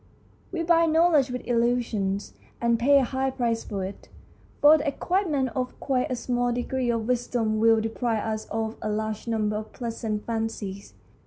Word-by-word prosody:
We 340 -3 -2
buy 335 0 +4
knowledge 320 -4 +4
with 250 0 -5
illusions, 230 -5 0 0.3
and 235 -1 +2
pay 280 +4 +5
a 275 - +4
high 265 +2 -1
price 235 -3 -1
for 195 -3 -4
it, 195 - -9 0.5
for 305 +2 +7
the 290 - -3
acquirement 300 -3 0
of 255 +1 -4
quite 260 -2 0
a 255 - -1
small 245 0 0
degree 245 +1 -1
of 230 -1 -1
wisdom 235 -3 0
will 225 0 +5
deprive 225 0 -1
us 220 -1 -3
of 220 0 -3
a 215 - -2
large 215 +1 -3
number 215 -2 0
of 215 0 -7
pleasant 225 -3 -4
fancies. 220 -4 -4
235 Hz, 170 wpm, -26 LUFS, 220-260 Hz, 0.5 s, for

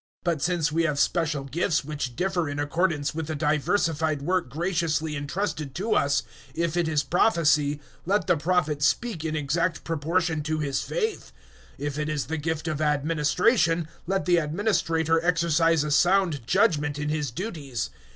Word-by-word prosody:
012:006 - - -92 0.2
But 170 -5 0
since 170 -3 +1
we 165 +2 +1
have 150 -3 0
special 155 -4 +1
gifts 150 +2 0
which 145 -5 -4
differ 180 -2 0
in 145 - -4
accordance 150 0 0
with 160 -1 -4
the 155 - -3
diversified 155 0 0
work 180 -2 0
graciously 160 0 -1
entrusted 145 -1 -3
to 215 +5 0
us, 140 -1 +2 0.3
if 170 -1 -1
it 175 -2 +1
is 150 -2 +1
prophecy, 150 -3 +2 0.3
let 200 -2 +2
the - - +3
prophet 155 -2 0
speak 170 +3 0
in 160 -1 -2
exact 155 +3 -1
proportion 165 +1 0
to 155 +1 -2
his 140 -3 -1
faith; 445 -3 -3 0.5
012:007 145 - -5
if 145 0 -3
it 150 0 -1
is 150 -5 -1
the 160 +5 -3
gift 160 +1 -3
of 155 -1 -2
administration, 160 - +2 0.2
let 195 0 0
the 175 -1 +4
administrator 165 -1 +1
exercise 165 -2 +3
a 150 - -3
sound 175 -6 +2
judgement 150 - +2
in 150 0 -2
his 150 -2 -1
duties. 140 - -4
160 Hz, 170 wpm, -26 LUFS, 150-175 Hz, 0.5 s, the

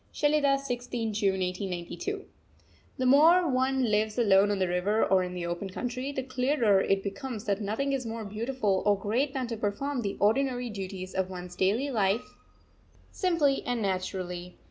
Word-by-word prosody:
SHELIDAH, 290 -2 +3
16th 245 -4 -3
June 200 -2 +1
1892. 185 - -4 0.7
The 255 - -1
more 325 +7 +6
one 260 0 +1
lives 215 -1 +1
alone 200 -3 +5
on 205 - 0
the 185 -1 +1
river 180 +5 +1
or 190 -1 +3
in 180 0 -4
the 175 -1 -3
open 175 +3 -3
country, 250 +7 -4
the 265 -2 -3
clearer 250 -6 +2
it 195 0 +1
becomes 220 +2 -5
that 200 0 0
nothing 225 +8 -1
is 270 -1 -1
more 225 -1 -5
beautiful 215 -1 -1
or 205 -1 +4
great 245 +8 -1
than 260 -1 -1
to 230 -1 -4
perform 240 +7 -2
the 200 -3 -3
ordinary 245 +3 +1
duties 190 -2 -6
of 190 -1 -1
one's 180 -1 -8
daily 225 +9 +1
life 210 -1 0 0.8
simply 325 -7 +1
and 245 -3 -2
naturally. 185 -2 -3
220 Hz, 165 wpm, -28 LUFS, 195-265 Hz, 0.8 s, more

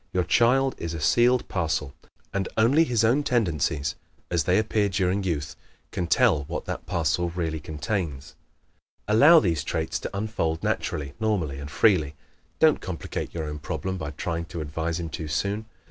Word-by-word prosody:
Your 90 - +2
child 125 +9 +3
is 85 0 -4
a - - -4
sealed 120 +9 +3
parcel 80 -6 -1 0.4
and 100 -1 -1
only 135 +9 +5
his 120 -6 +1
own 120 +6 +4
tendencies, 85 - 0 0.4
as 85 -4 +1
they 90 +1 +3
appear 110 -1 +1
during 95 +1 0
youth, 75 -5 -2 0.4
can 90 - -2
tell 75 -3 +3
what - - -5
that - - -5
parcel 85 +1 0
really 85 -2 -3
contains. 75 -1 -4 0.7
Allow 145 +11 +7
these 80 -6 0
traits 80 0 -2
to - - -5
unfold 100 -7 -2
naturally, 70 -2 -2
normally 90 -11 -1
and 70 0 -7
freely. 75 -2 +3 0.4
Don't 160 -1 +4
complicate 90 -3 -5
your 80 - -2
own 75 -1 -5
problem 95 +5 -4
by 80 -2 -4
trying 85 +2 -3
to 85 0 -6
advise 80 +3 -3
him 85 -1 -4
too 80 0 -5
soon. 100 +8 -2
85 Hz, 165 wpm, -25 LUFS, 80-105 Hz, 0.7 s, Allow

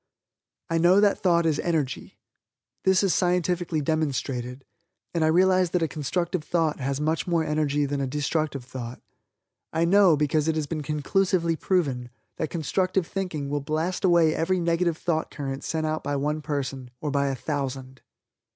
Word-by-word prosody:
I 165 - +2
know 175 +4 +5
that 205 -1 +3
Thought 170 -3 +3
is 155 -3 +1
Energy. 155 -7 -2 0.7
This 190 +1 +4
is 195 - +3
scientifically 175 -2 +1
demonstrated, 135 -4 -2 0.5
and 165 -2 +1
I - - +4
realize 185 +2 +4
that 180 0 0
a - - +2
constructive 160 +4 -2
thought 160 -2 0
has 135 +1 -2
much 155 +3 -1
more 170 -2 +2
energy 150 -2 0
than 140 0 -2
a 135 - -1
destructive 145 -1 -2
thought. 125 -1 -7 0.7
I 165 +1 +1
know, 185 -3 +5
because 150 +1 +1
it 160 - +1
has 155 -2 -1
been 155 +1 -4
conclusively 165 +4 +1
proven, 140 -9 0 0.3
that 155 - -2
constructive 185 +3 0
thinking 175 -7 -3
will 145 +1 -2
blast 160 +5 -2
away 170 -4 +4
every 185 +3 0
negative 170 -1 +1
thought 160 -3 -1
current 135 -2 -5
sent 160 -1 -2
out 155 0 -2
by 145 - -1
one 150 +2 -1
person, 135 -4 -4
or 150 - -3
by 140 0 +1
a 135 - -1
thousand. 130 -1 -4
155 Hz, 170 wpm, -26 LUFS, 140-175 Hz, 0.7 s, know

